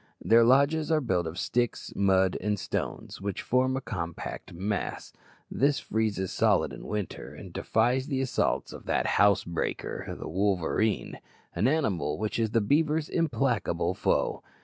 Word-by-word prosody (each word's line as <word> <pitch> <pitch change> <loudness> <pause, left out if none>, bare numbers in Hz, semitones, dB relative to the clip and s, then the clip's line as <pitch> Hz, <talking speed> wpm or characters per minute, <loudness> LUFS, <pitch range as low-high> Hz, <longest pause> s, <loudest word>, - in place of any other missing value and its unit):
Their 115 +1 +5
lodges 140 +6 +3
are 160 - +4
built 95 - 0
of 80 +2 -6
sticks, 120 +5 -1
mud, 95 -2 +3
and 105 +2 0
stones, - - -4
which 100 -1 -3
form 130 +1 +2
a - - -3
compact 85 -9 -5
mass; 95 +3 -3 0.4
this 140 +1 +2
freezes 105 -4 -1
solid - - +2
in - - -9
winter, 105 -4 -4
and - - -10
defies 125 +4 +1
the 135 -3 -1
assaults 130 -1 0
of - - -10
that - - +1 0.2
housebreaker, 100 -4 0
the - - -6
wolverine, 100 +3 0 0.3
an 110 - +1
animal 100 - 0
which 110 +2 -2
is 110 -1 +1
the 115 +1 +2
beaver's 150 +6 +1
implacable 140 -8 0
foe. - - 0
110 Hz, 150 wpm, -28 LUFS, 95-130 Hz, 0.4 s, Their